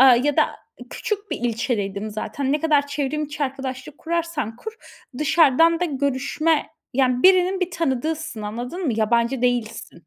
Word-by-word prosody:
ııı, 260 -2 +8
ya 290 - +1
da - - +6 0.5
küçük 415 -1 -4
bir - - -2
ilçedeydim 215 -3 -2
zaten. 265 +6 -3
Ne 300 - +1
kadar 295 -2 +3
çevrim 285 +1 -2
içi 290 0 -3
arkadaşlık 265 +1 -6
kurarsan 330 -9 -2
kur 440 - -7 0.5
dışarıdan 325 +2 +4
da - - +2
görüşme, 285 +2 0 0.2
yani, 255 -1 +2
birinin 370 0 +5
bir 365 -1 0
tanıdığısın 315 -4 -2
anladın 245 - -4
mı? 250 - +1
Yabancı 235 +3 +1
değilsin. 230 -8 -2
280 Hz, 150 wpm, -22 LUFS, 245-320 Hz, 0.5 s, ııı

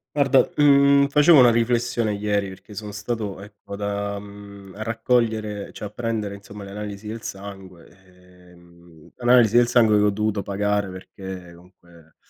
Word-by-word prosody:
Guarda, 135 -3 +4
mhmm, 140 -1 +5
facevo 150 +1 +6
una 120 -2 +7
riflessione 120 -1 0
ieri, 100 -1 -1
perché 95 +2 -13
sono 105 +1 -7
stato 100 -1 -4
ecco 100 0 -11
da 100 0 -3
mhmm, 100 -1 -12
a 110 - -5
raccogliere 110 -3 -1
cioè - - -8
a - - -6
prendere 110 -2 -4
insomma 100 +1 -11
le 100 - -10
analisi 105 0 -7
del 110 +1 -6
sangue, 95 -3 -10 0.6
ehm, 85 -2 -19
analisi 120 -2 +4
del 120 0 +5
sangue 110 -4 +4
che 105 - +3
ho 105 - +4
dovuto 105 0 -1
pagare 100 0 -1
perché 95 -1 -9
comunque, 85 -2 -21
105 Hz, 155 wpm, -23 LUFS, 100-115 Hz, 0.6 s, una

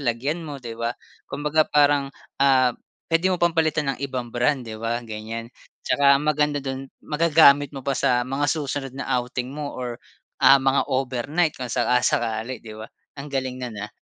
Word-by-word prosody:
lagyan 140 +6 -1
mo 150 -3 -7
'di 120 -3 -8
ba? 115 +1 -3 0.3
Kumbaga 150 +2 +1
parang, 145 -1 +3 0.3
ah, 130 -3 +4 0.4
puwede 170 +3 +3
mo 185 - +1
pang 170 -1 +2
palitan 155 -3 +1
ng - - -9
ibang 130 -4 -4
brand 125 +2 +1
'di 110 -1 -8
ba? 120 +1 -2
Ganyan 115 +2 -7 0.3
tsaka 140 -1 +4
maganda 150 0 +1
do'n 135 0 -5 0.2
magagamit 150 -3 +5
mo 135 - -7
pa 140 - 0
sa 125 -2 +1
mga 135 +2 -1
susunod 140 -3 -2
na 140 - -4 0.2
outing 125 +1 -5
mo 145 -1 -6
or 125 -1 -5 0.4
ah, 135 - +8
mga 135 0 +1
overnight 135 +5 0
kung 125 -1 -6
saka-sakali 120 -1 0
'di 110 - -9
ba? 110 - -8 0.3
Ang 140 +1 -8
galing 130 -2 -2
nun 120 -5 -6
ha. 105 - -5
135 Hz, 175 wpm, -23 LUFS, 120-145 Hz, 0.4 s, ah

